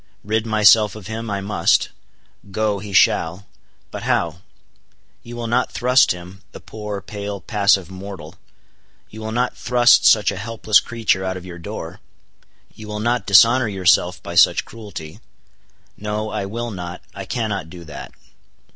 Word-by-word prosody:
Rid 110 +2 -1
myself 110 -1 +5
of 105 -3 -10
him, 110 +2 -5
I 100 -1 -2
must; 100 -4 +1 0.6
go, 105 +1 -1
he 100 +1 -8
shall. 90 +1 +2 0.5
But - - -6
how? 85 -1 -1 0.8
You 120 0 -10
will 120 0 -5
not 120 +2 0
thrust 125 +1 +3
him, 90 +2 -8
the - - -9
poor, 105 -2 -7
pale, 100 -1 -6
passive 100 -4 +1
mortal,—you 95 +3 -13
will 110 0 -5
not 125 +2 -1
thrust 120 -1 +4
such 105 -2 +5
a 100 - -6
helpless 110 -1 +2
creature 115 -5 -1
out 95 0 -3
of 90 - -10
your 85 -1 -9
door? 85 - -7 0.7
you 110 - -11
will 105 0 -5
not 120 +2 -1
dishonor 115 +5 +6
yourself 90 -3 +2
by 85 - -7
such 85 - +4
cruelty? 100 -8 -10 0.8
No, 105 +1 -4
I 105 -2 -3
will 120 +3 -4
not, 90 -2 -7
I 100 -1 -7
cannot 100 -7 -3
do 85 0 -11
that. 75 -4 -9
105 Hz, 155 wpm, -20 LUFS, 95-110 Hz, 0.8 s, dishonor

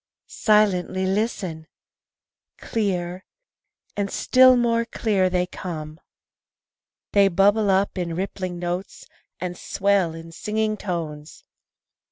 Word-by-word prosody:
Silently 190 -3 +2
listen! 185 -5 -2 0.9
Clear, 185 -4 -2 0.7
and 200 -1 -1
still 255 +3 +5
more 230 -1 +2
clear, 205 -5 0
they 180 0 +1
come. 155 -4 -7 1.1
They 200 -1 +5
bubble 200 +3 +3
up 190 0 +1
in 170 -2 -3
rippling 185 -1 -4
notes, 175 +2 -5 0.3
and 180 -1 -4
swell 195 -3 0
in 165 0 -10
singing 215 +4 -1
tones. 160 -6 -6
190 Hz, 100 wpm, -23 LUFS, 175-210 Hz, 1.1 s, still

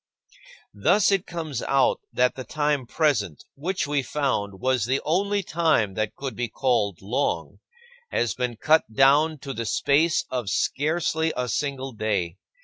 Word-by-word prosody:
20. 100 - -16
Thus 195 +4 +4
it 195 -2 +1
comes 160 -7 -4
out 135 -1 +2
that 125 0 +2 0.2
time 145 -4 0
present, 115 - 0
which 180 +7 -2
we 145 -1 0
found 120 -9 -2
was 130 -2 +1
the 130 +3 +1
only 200 +5 +1
time 160 - +1
that 110 +1 -2
could 135 -4 -5
be 120 +2 -2
called 110 - 0
"long," 125 +8 -2 0.5
has 120 - 0
been 125 -2 -3
cut 155 -1 +3
down 145 +6 +4
to 140 -1 -7
the 115 -3 -4
space 155 +8 +2
of 125 -6 -2
scarcely 160 - 0
a 125 0 -1
single 135 +2 -2
day. 100 -6 -2
135 Hz, 150 wpm, -25 LUFS, 115-155 Hz, 0.5 s, Thus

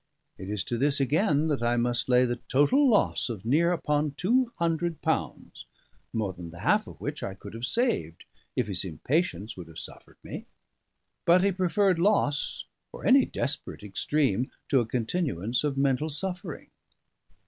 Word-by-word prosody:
It 95 +1 -7
is 105 -3 -1
to 120 - -3
this, 140 +1 +2
again, 150 - +2
that 145 -5 0
I 120 0 +1
must 120 +1 0
lay 125 0 +5
the 120 0 -1
total 255 - +4
loss 210 - +2
of 110 -4 -6
near 160 +8 +3
upon 150 -3 0
two 235 - +2
hundred 170 -1 0
pounds, - - -2 0.5
more 105 -4 -2
than 85 -1 -9
the 85 +1 -11
half - - +2
of - - -11
which - - -4
I 95 - -4
could 100 +2 -11
have 115 +2 -4
saved 110 - -1 0.3
if - - +1
his 100 -3 -2
impatience 110 - -1
would 90 -3 -9
have 80 -1 -13
suffered - - -10
me. - - -7 0.8
But 180 +2 +5
he 200 - +3
preferred 185 0 +2
loss 170 -6 +1 0.3
or - - -9
any 265 0 +6
desperate 140 -6 -4
extreme 125 +3 0 0.2
to 135 - +4
a 120 - -1
continuance 120 - -1
of 145 -2 -1
mental 140 +2 +1
suffering. 180 +2 -3
140 Hz, 170 wpm, -28 LUFS, 115-175 Hz, 0.8 s, any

